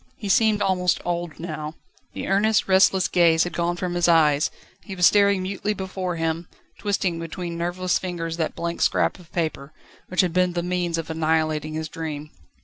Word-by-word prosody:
He 205 - -5
seemed 215 +1 +3
almost 180 -2 +1
old 175 -2 -3
now. 155 -2 -5 0.4
The - - -5
earnest, 205 +2 +2
restless 190 0 +4
gaze 165 -2 +4
had 175 - -4
gone 175 0 0
from 180 -1 -3
his 175 0 +2
eyes; 155 -3 +4 0.3
he 195 - -7
was 180 -1 +3
staring 200 -1 +4
mutely 200 +2 -2
before 185 -2 -4
him, 165 +1 -2 0.3
twisting 195 -5 -1
between 170 +1 -5
nerveless 175 +2 -1
fingers 165 -3 -4
that 160 -2 -2
blank 170 0 -4
scrap - - +2
of 170 -2 -17
paper, 155 -4 -3 0.3
which 185 - +2
had 180 -3 -1
been 180 -1 +2
the 175 -1 -2
means 175 -1 -1
of 165 0 -4
annihilating 155 -1 0
his 160 0 -3
dream. 155 -1 -6
175 Hz, 180 wpm, -24 LUFS, 160-185 Hz, 0.4 s, restless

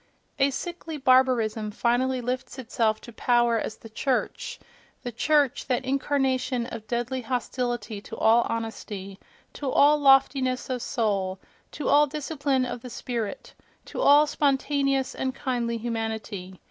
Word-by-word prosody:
A 275 0 +4
sickly 335 +2 -5
barbarism 255 -5 +3
finally 245 +4 0
lifts 255 +2 -4
itself 225 -3 0
to 235 - -12
power 240 0 +2
as 215 - -5
the - - -12
church—the 250 0 -4
church, 285 +2 +1
that 260 0 0
incarnation 265 -2 0
of 230 -3 -8
deadly 240 +3 -2
hostility 240 -3 -3
to - - -9
all 230 +2 +5
honesty, 210 -4 -5 0.3
to 280 - -4
all 295 +3 +5
loftiness 270 -2 +3
of 250 -1 -2
soul, 200 -6 -1 0.4
to 295 - -4
all 295 +1 +5
discipline 280 -2 -1
of 245 -1 -5
the 250 - -8
spirit, 230 -3 -5 0.3
to - - -5
all 290 +1 +7
spontaneous 275 -2 +1
and 260 0 -3
kindly 240 -4 -2
humanity. 220 -5 -4
250 Hz, 135 wpm, -26 LUFS, 230-270 Hz, 0.4 s, all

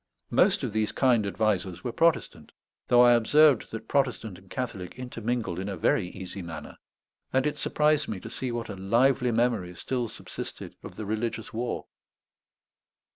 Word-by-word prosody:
Most - - +4
of - - -2
these 110 -1 +1
kind 120 -6 +3
advisers 95 -4 -1
were 120 - -2
Protestant, 165 0 +1 0.4
though 120 0 +6
I 120 0 +7
observed 140 +3 +5
that 110 - -7
Protestant 125 -8 0
and 95 -1 -21
Catholic 110 -7 -5
intermingled 120 -6 -3
in 95 +2 -3
a 95 - -4
very 90 +3 +2
easy 95 +1 -7
manner; 85 -2 -8 0.5
and 130 0 +2
it 150 - -1
surprised 150 -1 +2
me 100 - -4
to - - -8
see 130 -2 -3
what 120 -1 -3
a 100 - -5
lively 120 +7 +2
memory 115 -6 0
still 125 +5 -2
subsisted - - -7
of - - -10
the 110 - -5
religious 110 +1 -3
war. 120 +2 -3
115 Hz, 165 wpm, -27 LUFS, 100-125 Hz, 0.5 s, I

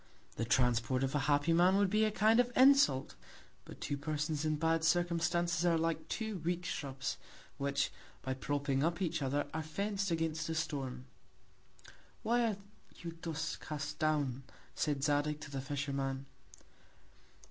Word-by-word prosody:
The 115 - -2
Transport 125 +1 +2
of 135 - -1
a 145 - +2
happy 145 +3 +3
Man, 180 +3 +5
would 200 -2 +2
be 215 +1 +3
a - - +2
Kind 215 +2 +4
of 245 0 +3
Insult; 260 - +5 0.5
but - - -11
two 145 - -2
Persons 150 +1 -2
in 155 -1 +1
bad 160 +1 +1
Circumstances, 170 0 +1
are 170 -2 +3
like 160 0 -1
two 220 -1 -3
weak 175 +2 -2
Shrubs, 135 -4 -3 0.4
which, 140 0 0 0.3
by 130 - -1
propping 140 0 -1
up 165 +2 +1
each 170 -4 -1
other, 140 +2 0
are 160 - -1
fenc'd 195 +4 -2
against 160 -1 -1
a 160 - -1
Storm. 135 -6 -3 1.2
Why 235 +2 +2
are 210 -3 -1 0.5
you 170 -1 -5
thus 160 -2 -3
cast 150 +1 -5
down, 145 -5 +1 0.3
said 145 -2 -1
Zadig 145 +1 +1
to 145 - -8
the 135 -1 -3
Fisherman? 135 -1 -3
155 Hz, 155 wpm, -34 LUFS, 140-175 Hz, 1.2 s, Man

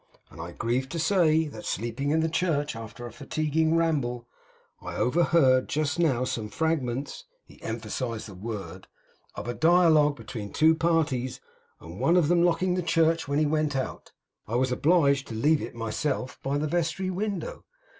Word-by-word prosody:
I 85 +2 -8
grieve 125 +6 -1
to 170 - -5
say 165 -2 +3
that 110 -6 -10
sleeping 120 +6 -3
in 160 +2 +2
the 160 - +1
church 160 -4 -1
after 115 +1 -8
a 120 - -7
fatiguing 155 +4 0
ramble, 135 -8 0 0.5
I - - -7
overheard 135 -3 +3
just 155 +2 -1
now 135 -8 +2
some 110 -4 -3
fragments,' 145 - -2 0.2
he - - -19
emphasised 115 -4 -4
that 100 - -10
word, 95 -4 -7 0.5
'of - - -6
a 120 - -2
dialogue 160 -2 +4
between 105 -7 -7
two 160 +1 +5
parties; 160 -6 0 0.4
and 85 +4 -10
one 165 +8 +3
of 165 -4 +3
them 175 -1 +4
locking 175 +1 +2
the 180 - 0
church 165 -1 +2
when 140 +1 0
he 155 - +3
went 155 -1 0
out, 130 - -4 0.4
I 110 - -3
was 130 +1 +1
obliged 140 -1 +3
to 115 - -6
leave 150 +7 +2
it - - -7
myself 125 +3 -3
by 140 +1 -1
the 150 - -1
vestry 170 +3 -1
window. 210 - -4
145 Hz, 170 wpm, -27 LUFS, 120-165 Hz, 0.5 s, two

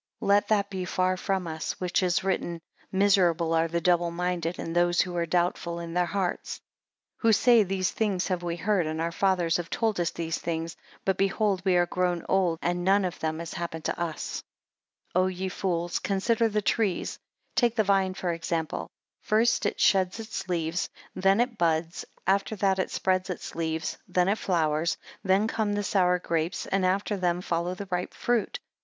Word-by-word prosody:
11 - - -2
Let 205 0 +2
that 205 -2 +2
be 190 -1 -3
far 185 +1 +1
from 190 -1 -1
us 160 -1 -4
which 180 0 +1
is 180 -1 +1
written, 175 -3 -1 0.3
Miserable 180 -4 +3
are 165 0 +3
the 170 +1 -1
double 175 0 +2
minded, 175 0 -2
and 165 - -5
those 175 0 +4
who 180 -1 -3
are 170 -1 0
doubtful 170 0 0
in 170 -1 -6
their 180 0 +2
hearts; 190 -1 -2 0.6
12 - - -30
Who - - +6
say 235 +2 +6
these 190 -2 0
things 200 -5 0
have 180 -2 -1
we 170 -1 -2
heard, 180 -1 +1
and 155 0 -3
our 165 +1 -1
fathers 175 -2 +2
have 175 -1 -5
told 220 -4 0
us 170 -2 +1
these 165 -1 -3
things. 165 0 -3 0.3
But 190 -1 +1
behold 195 0 +1
we 190 -2 +3
are 175 0 +4
grown 180 -1 -1
old, 185 -4 +2
and 175 0 0
none 195 +1 +4
of 180 - -4
them 160 0 -2
has 170 0 -6
happened 165 -2 -4
unto - - -3
us. 165 -2 -3 0.7
13 185 - +4
O - - +2
ye 185 0 -3
fools 175 -2 -1
consider 225 +4 +1
the 210 0 -1
trees: 205 -4 0 0.4
take 240 -2 +3
the 220 - +3
vine 195 -2 +2
for 185 - -3
an - - -2
example. 165 -1 -3 0.3
First 230 +2 +2
it - - -3
sheds 190 +1 +3
its 220 -4 -5
leaves; 170 0 -1 0.2
then 195 +2 +3
it 240 -1 0
buds; 165 0 0 0.2
after 195 +3 +1
that 195 -1 +1
it 185 - 0
spreads 185 0 0
its 180 - -5
leaves; 160 -1 -2
then 180 +1 +2
it 210 - +1
flowers; 160 -2 +1 0.3
then 195 +2 +3
come 220 -2 -1
the 205 0 -1
sour 180 -3 +3
grapes; 165 -1 -2
and 190 -1 +1
after 200 +2 0
them 175 -1 +1
follows 175 +1 -2
the 200 - -5
ripe 180 0 -2
fruit. 240 -2 0
180 Hz, 200 wpm, -27 LUFS, 170-195 Hz, 0.7 s, Who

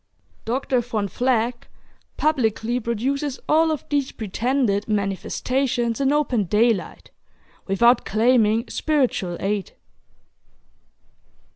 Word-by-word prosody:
Dr. 255 +1 0
Von 225 -4 -2
Vleck 245 0 0 0.5
publicly 240 -5 0
produces 255 +5 -2
all 320 +1 +4
of 310 -4 -3
these 285 -2 0
pretended 220 0 -1
"manifestations" 235 +5 -1
in 275 0 +2
open 270 -8 +1
daylight, 215 +2 0 0.6
without 235 +5 +4
claiming 225 +1 +2
spiritual 250 - 0
aid. 200 0 -2
235 Hz, 90 wpm, -22 LUFS, 215-265 Hz, 0.6 s, all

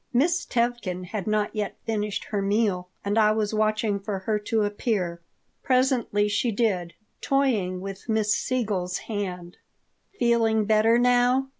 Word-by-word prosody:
Miss 335 +8 +1
Tevkin 235 -7 -1
had 195 +1 -5
not 215 0 0
yet 210 -2 -3
finished 210 -2 -2
her 205 -2 -3
meal 195 -3 0 0.2
and 205 +2 +1
I 215 -1 +5
was 215 -1 -1
watching 215 -1 +1
for 200 0 -4
her 210 +3 -1
to 215 +1 0
appear. 205 -5 -2 0.4
Presently 255 -5 +2
she 225 +3 0
did, 195 -6 -1 0.3
toying 220 -10 +1
with 195 +3 -8
Miss 215 -2 +2
Siegel's 200 -9 -1
hand 180 -5 -5 0.6
"Feeling 225 -2 +2
better 220 +2 +4
now?" 250 +2 +3
215 Hz, 140 wpm, -25 LUFS, 200-235 Hz, 0.6 s, I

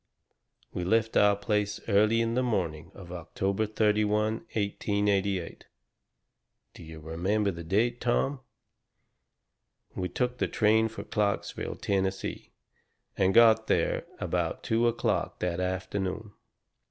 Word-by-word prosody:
"We 90 - -3
left 110 +4 +1
your 105 0 +5
place 105 0 -1
early 110 +2 +3
on 115 0 -1
the 125 - +1
morning 85 -9 -2
of 90 -3 -11
October 95 +4 -2
31, 105 0 +1 0.2
1888 100 -3 -1 1.1
do - - -13
you 80 -1 -10
remember 95 +7 -1
the 85 -1 -8
date, 115 +8 0
Tom? 130 +3 0 1.6
We 90 -1 -2
took 125 -1 -2
the - - +1
train 110 +1 +3
for 110 - -8
Clarksville, 105 -2 -2
Tennessee, 95 -1 -2 0.7
and 95 -1 +2
got 110 0 +6
there - - 0
about - - -2
two 115 +1 +2
o'clock 115 - -1
that 90 -1 -1
afternoon. 95 +3 -3
105 Hz, 115 wpm, -28 LUFS, 95-110 Hz, 1.6 s, got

